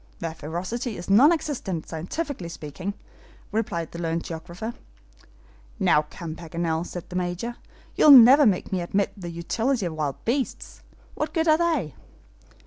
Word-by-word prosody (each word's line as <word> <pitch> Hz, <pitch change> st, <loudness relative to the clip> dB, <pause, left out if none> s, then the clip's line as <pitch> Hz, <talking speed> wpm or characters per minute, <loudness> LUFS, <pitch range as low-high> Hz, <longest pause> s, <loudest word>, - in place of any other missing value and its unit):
"Their 165 Hz, -1 st, -4 dB
ferocity 185 Hz, -, -4 dB
is 175 Hz, +3 st, -5 dB
non 260 Hz, +11 st, +7 dB
existent, 255 Hz, -, -2 dB
scientifically 180 Hz, -, -4 dB
speaking," 170 Hz, +5 st, -6 dB, 0.6 s
replied 200 Hz, -7 st, -2 dB
the 170 Hz, -, -7 dB
learned 165 Hz, 0 st, -1 dB
geographer. 175 Hz, +7 st, -6 dB, 1.1 s
"Now 150 Hz, 0 st, +3 dB
come, 165 Hz, -3 st, -7 dB
Paganel," 165 Hz, 0 st, -3 dB
said 175 Hz, -, -7 dB
the -, -, -6 dB
Major, 180 Hz, +7 st, -3 dB, 0.4 s
"you'll -, -, +5 dB
never 270 Hz, +1 st, +9 dB
make 190 Hz, -4 st, 0 dB
me 185 Hz, -2 st, 0 dB
admit 195 Hz, +3 st, -1 dB
the 180 Hz, -4 st, -7 dB
utility 220 Hz, +8 st, -1 dB
of 170 Hz, -, -3 dB
wild 150 Hz, -3 st, -4 dB
beasts. 260 Hz, +3 st, -2 dB, 0.3 s
What -, -, -4 dB
good 325 Hz, 0 st, +1 dB
are 310 Hz, 0 st, +5 dB
they?" 315 Hz, -, 0 dB
180 Hz, 145 wpm, -25 LUFS, 165-240 Hz, 1.1 s, never